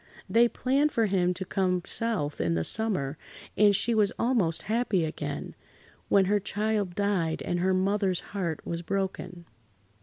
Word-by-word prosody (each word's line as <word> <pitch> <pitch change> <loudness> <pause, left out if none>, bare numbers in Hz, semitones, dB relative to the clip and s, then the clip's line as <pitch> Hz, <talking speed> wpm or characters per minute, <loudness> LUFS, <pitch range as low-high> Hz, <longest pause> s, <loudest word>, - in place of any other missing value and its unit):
They 235 +1 +4
planned 275 +6 +1
for 230 -3 +2
him 185 -3 +1
to 190 - -5
come 180 -2 0
South 160 -11 -1
in 85 0 0
the 80 - 0
summer, 170 - 0 0.4
and 205 -1 +5
she 230 +5 +1
was 210 -3 +3
almost 220 -10 +1
happy 220 -4 0
[Pg 155 0 -3
72]again, - - -5 0.6
when 195 -1 +4
her 205 +2 +2
child 205 -2 -2
died 190 -6 0
and 175 - -1
her 185 +1 +2
mother's 190 -1 +1
heart 175 -6 -3
was 170 0 -3
broken. 180 -2 -4
195 Hz, 160 wpm, -27 LUFS, 175-215 Hz, 0.6 s, and